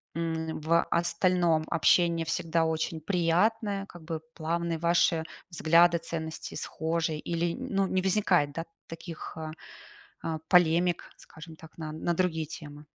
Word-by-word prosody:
м, 160 Hz, -1 st, -2 dB
в 165 Hz, +2 st, +3 dB
остальном 170 Hz, -1 st, +2 dB
общение 170 Hz, 0 st, +3 dB
всегда 165 Hz, 0 st, 0 dB
очень 160 Hz, 0 st, -2 dB
приятное, 195 Hz, +5 st, +1 dB
как 175 Hz, -4 st, -13 dB
бы 160 Hz, -1 st, -4 dB
плавные, 170 Hz, +1 st, -2 dB
ваши 170 Hz, -1 st, +3 dB, 0.3 s
взгляды, 170 Hz, +1 st, +4 dB
ценности 160 Hz, -1 st, -5 dB
схожие? 160 Hz, 0 st, -2 dB
Или 170 Hz, +1 st, -1 dB
н -, -, -6 dB
ну, 195 Hz, 0 st, +3 dB
не 185 Hz, 0 st, 0 dB
возникает, 185 Hz, -6 st, +2 dB
да 165 Hz, +2 st, -4 dB, 0.2 s
таких, 165 Hz, 0 st, -8 dB
а, 155 Hz, -1 st, -5 dB, 0.7 s
а, 160 Hz, -1 st, -3 dB
полемик, 175 Hz, -1 st, +3 dB
скажем 160 Hz, 0 st, -12 dB
так, 160 Hz, 0 st, -15 dB
на 155 Hz, -2 st, -5 dB
на 160 Hz, +2 st, -1 dB
другие 160 Hz, -2 st, 0 dB
темы? 150 Hz, -1 st, -10 dB
165 Hz, 140 wpm, -29 LUFS, 160-175 Hz, 0.7 s, взгляды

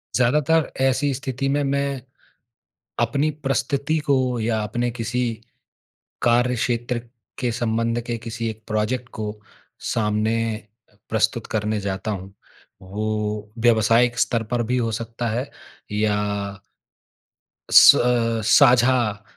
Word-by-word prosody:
ज़्यादातर 150 Hz, +5 st, +2 dB
ऐसी 135 Hz, +2 st, +2 dB
स्थिति 135 Hz, 0 st, -3 dB
में 140 Hz, -1 st, 0 dB, 1.0 s
अपनी 140 Hz, +6 st, +1 dB
परिस्थिति 140 Hz, +3 st, 0 dB
को 140 Hz, -, +4 dB, 0.3 s
या 110 Hz, 0 st, 0 dB
अपने 120 Hz, +3 st, -2 dB
किसी 120 Hz, +1 st, -2 dB, 1.0 s
कार्य 120 Hz, +1 st, +3 dB
क्षेत्र 120 Hz, 0 st, -1 dB, 0.4 s
के 125 Hz, -2 st, 0 dB
संबंध 115 Hz, 0 st, -1 dB
के 120 Hz, -1 st, -2 dB
किसी 115 Hz, 0 st, -4 dB
एक 110 Hz, 0 st, -8 dB
प्रोजेक्ट 110 Hz, +4 st, -1 dB
को 105 Hz, -1 st, -4 dB, 0.6 s
सामने 110 Hz, 0 st, 0 dB, 0.2 s
अ, 105 Hz, 0 st, -23 dB
प्रस्तुत 110 Hz, +1 st, 0 dB
करने 105 Hz, 0 st, 0 dB
जाता 100 Hz, +2 st, -3 dB
हूँ 95 Hz, -1 st, -6 dB, 0.5 s
वो 100 Hz, +3 st, -5 dB, 0.5 s
व्यावसायिक 115 Hz, +1 st, +3 dB
स्तर 115 Hz, -1 st, +1 dB
पर 120 Hz, -1 st, +1 dB
भी 125 Hz, -, +2 dB
हो 115 Hz, -2 st, 0 dB
सकता 115 Hz, +2 st, -4 dB
है 125 Hz, +5 st, -3 dB, 0.4 s
या 105 Hz, 0 st, +1 dB, 1.6 s
स्व -, -, +9 dB
अ, 115 Hz, -2 st, +1 dB
साझा 120 Hz, -4 st, +4 dB
120 Hz, 115 wpm, -22 LUFS, 110-125 Hz, 1.6 s, स्व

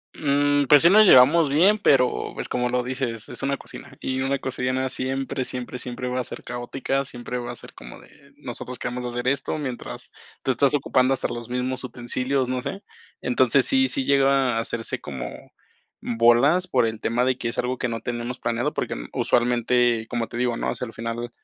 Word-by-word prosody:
Mm, 145 Hz, 0 st, +2 dB
pues 145 Hz, +2 st, +6 dB
sí 170 Hz, -, +7 dB
nos 215 Hz, +1 st, +7 dB
llevamos 145 Hz, +2 st, +7 dB
bien, 190 Hz, +9 st, +4 dB
pero, 130 Hz, -8 st, +2 dB
pues, -, -, -4 dB
como 125 Hz, 0 st, -1 dB
lo 125 Hz, 0 st, 0 dB
dices, 125 Hz, -3 st, -3 dB
es -, -, -5 dB
una 140 Hz, 0 st, -1 dB
cocina, 135 Hz, -, -11 dB
y 130 Hz, 0 st, -2 dB
una 135 Hz, +1 st, 0 dB
cocina 130 Hz, 0 st, -2 dB
siempre, 135 Hz, +1 st, -2 dB
siempre, 125 Hz, 0 st, -5 dB
siempre 125 Hz, 0 st, -5 dB
va 125 Hz, 0 st, -2 dB
a 125 Hz, -, -1 dB
ser -, -, -9 dB
caótica, 130 Hz, +3 st, -3 dB
siempre 125 Hz, -2 st, -6 dB
va 120 Hz, -, -5 dB
a -, -, -8 dB
ser -, -, -12 dB
como -, -, -12 dB
de -, -, -20 dB
nosotros 125 Hz, 0 st, -7 dB
queremos 125 Hz, 0 st, -4 dB
hacer 120 Hz, +1 st, -3 dB
esto, 140 Hz, +3 st, 0 dB
mientras, 125 Hz, -, -6 dB, 0.3 s
tú 130 Hz, -, +1 dB
estás 140 Hz, +3 st, +2 dB
ocupando 130 Hz, -1 st, +2 dB
hasta -, -, -3 dB
los 120 Hz, 0 st, -6 dB
mismos 125 Hz, +1 st, -2 dB
utensilios, 125 Hz, +2 st, -1 dB
no 125 Hz, 0 st, -2 dB
sé. 190 Hz, +9 st, -6 dB, 0.4 s
Entonces, -, -, +3 dB
sí, 265 Hz, -1 st, +4 dB
sí 270 Hz, -2 st, -1 dB
llega 135 Hz, -3 st, +3 dB
a -, -, +1 dB
hacerse 115 Hz, 0 st, -3 dB
como 65 Hz, -3 st, -6 dB, 0.7 s
bolas 120 Hz, +10 st, +4 dB
por 125 Hz, -3 st, +2 dB
el 110 Hz, -1 st, -3 dB
tema 120 Hz, +2 st, 0 dB
de 130 Hz, 0 st, +1 dB
que 120 Hz, -, -4 dB
es 115 Hz, -, -4 dB
algo 125 Hz, +1 st, -1 dB
que 125 Hz, -, -1 dB
no 115 Hz, -1 st, -4 dB
tenemos 120 Hz, +1 st, -4 dB
planeado, 120 Hz, +1 st, -2 dB
porque -, -, -3 dB, 0.2 s
usualmente, 120 Hz, -1 st, +2 dB
como 115 Hz, -1 st, -2 dB
te -, -, -10 dB
digo, 120 Hz, -1 st, 0 dB
¿no?, -, -, -1 dB
o -, -, -4 dB
sea, -, -, -4 dB
al 115 Hz, -, -9 dB
final 115 Hz, +1 st, -4 dB
125 Hz, 205 wpm, -24 LUFS, 120-135 Hz, 0.7 s, sí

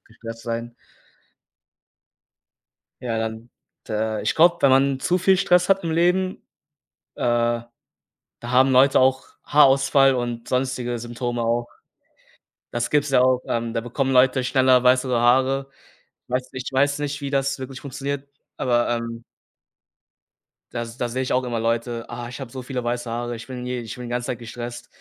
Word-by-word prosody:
gestresst 115 Hz, 0 st, -10 dB
sein. 115 Hz, 0 st, -4 dB, 2.3 s
Ja, 120 Hz, -2 st, -2 dB
dann, 110 Hz, +1 st, -4 dB, 0.4 s
d -, -, -6 dB
äh, 110 Hz, 0 st, -1 dB
ich -, -, 0 dB
glaube, 170 Hz, +2 st, +5 dB
wenn 140 Hz, -, +5 dB
man 135 Hz, 0 st, +3 dB
zu 180 Hz, +6 st, +1 dB
viel 190 Hz, +1 st, +4 dB
Stress 180 Hz, -1 st, +3 dB
hat 195 Hz, -1 st, +2 dB
im 165 Hz, -, -1 dB
Leben, 180 Hz, +3 st, +1 dB, 0.8 s
äh, -, -, -5 dB
da 120 Hz, -1 st, +1 dB, 0.8 s
haben 125 Hz, +3 st, +3 dB
Leute 130 Hz, +1 st, +5 dB
auch 130 Hz, +1 st, +2 dB, 0.2 s
Haarausfall 135 Hz, -1 st, +5 dB
und 120 Hz, -2 st, -4 dB
sonstige 125 Hz, -2 st, -1 dB
Symptome 120 Hz, 0 st, -3 dB
auch. 120 Hz, +1 st, 0 dB, 1.0 s
Das 120 Hz, 0 st, -2 dB
gibt's 150 Hz, 0 st, +2 dB
ja 130 Hz, -2 st, +4 dB
auch 130 Hz, 0 st, +3 dB
ähm, 115 Hz, -1 st, -2 dB
da 115 Hz, -, -1 dB
bekommen 130 Hz, +3 st, -2 dB
Leute 130 Hz, +1 st, +4 dB
schneller 130 Hz, -1 st, +3 dB
weißere 125 Hz, 0 st, +3 dB
Haare. 135 Hz, +3 st, +2 dB, 0.6 s
Weiß 125 Hz, +1 st, -2 dB
ich 130 Hz, -1 st, -5 dB
weiß 140 Hz, +2 st, +2 dB
nicht, 145 Hz, 0 st, -3 dB
wie 140 Hz, -, -3 dB
das 135 Hz, 0 st, 0 dB
wirklich 130 Hz, 0 st, -7 dB
funktioniert, 140 Hz, +1 st, -5 dB, 0.3 s
aber, 120 Hz, -1 st, +1 dB
ähm 115 Hz, -1 st, -3 dB, 1.5 s
Da 120 Hz, -1 st, -3 dB
da 115 Hz, +1 st, -4 dB
sehe 130 Hz, +2 st, -2 dB
ich 130 Hz, -, -2 dB
auch 130 Hz, 0 st, +1 dB
immer 120 Hz, -2 st, -2 dB
Leute: 115 Hz, +1 st, -1 dB
„Ah, 120 Hz, 0 st, -6 dB
ich 125 Hz, +3 st, -9 dB
habe 130 Hz, -3 st, -7 dB
so 130 Hz, +1 st, -7 dB
viele 125 Hz, -1 st, -4 dB
weiße 120 Hz, 0 st, -2 dB
Haare. 120 Hz, +1 st, -3 dB
Ich 115 Hz, -, -10 dB
bin 125 Hz, -2 st, -7 dB
je 125 Hz, -1 st, -3 dB
ich 115 Hz, -2 st, -7 dB
bin 125 Hz, -, -8 dB
die 120 Hz, -, -7 dB
ganze 120 Hz, 0 st, -2 dB
Zeit 125 Hz, -, -3 dB
gestresst.” 120 Hz, 0 st, -8 dB
125 Hz, 170 wpm, -23 LUFS, 120-135 Hz, 2.3 s, glaube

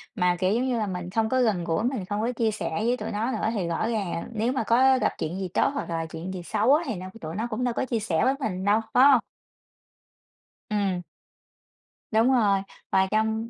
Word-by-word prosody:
mà, 180 Hz, 0 st, +2 dB
kiểu, 185 Hz, +2 st, +2 dB
giống 240 Hz, +3 st, +1 dB
như 250 Hz, -2 st, 0 dB
là, 215 Hz, -2 st, -1 dB
mình 180 Hz, -2 st, -4 dB
không 220 Hz, +3 st, 0 dB
có 260 Hz, +1 st, +2 dB
gần 210 Hz, -8 st, +1 dB
gũi, 170 Hz, +5 st, -1 dB
mình 245 Hz, -6 st, -1 dB
không 205 Hz, +2 st, -2 dB
có 235 Hz, +3 st, 0 dB
chia 225 Hz, -2 st, 0 dB
sẻ 215 Hz, -, -3 dB, 0.2 s
với 245 Hz, +1 st, +2 dB
tụi -, -, -5 dB
nó 220 Hz, +5 st, -1 dB
nữa 220 Hz, -, -1 dB
thì 195 Hz, -6 st, -1 dB
rõ 170 Hz, +6 st, -1 dB
ràng 195 Hz, -7 st, -2 dB
nếu 225 Hz, +2 st, 0 dB
mà 265 Hz, -, 0 dB
có 260 Hz, +4 st, +4 dB
gặp -, -, +2 dB
chuyện 165 Hz, +4 st, -3 dB
gì 190 Hz, -, -2 dB
tốt -, -, +3 dB
hoặc 280 Hz, -, -4 dB
là 165 Hz, -1 st, -2 dB
chuyện 165 Hz, +3 st, -6 dB
gì 180 Hz, -2 st, -6 dB
xấu 220 Hz, +9 st, +2 dB
á 320 Hz, -, 0 dB
thì 230 Hz, -, -2 dB
nó 185 Hz, 0 st, -7 dB, 0.2 s
tụi 160 Hz, +1 st, -6 dB
nó 220 Hz, +4 st, -2 dB
cũng 235 Hz, +2 st, -2 dB
đâu 245 Hz, -1 st, 0 dB
có -, -, -1 dB
chia 235 Hz, -3 st, -1 dB
sẻ 185 Hz, -7 st, 0 dB
với 260 Hz, -, +3 dB
mình 190 Hz, -6 st, -2 dB
đâu, 210 Hz, +2 st, +3 dB
phải 250 Hz, -, +6 dB
hông? 260 Hz, -, +6 dB, 1.5 s
Ừm. 200 Hz, -4 st, 0 dB, 1.1 s
Đúng 225 Hz, +2 st, +4 dB
rồi, 205 Hz, -6 st, +3 dB, 0.3 s
và 190 Hz, 0 st, +3 dB
trong 220 Hz, +1 st, 0 dB
215 Hz, 240 wpm, -26 LUFS, 185-235 Hz, 1.5 s, phải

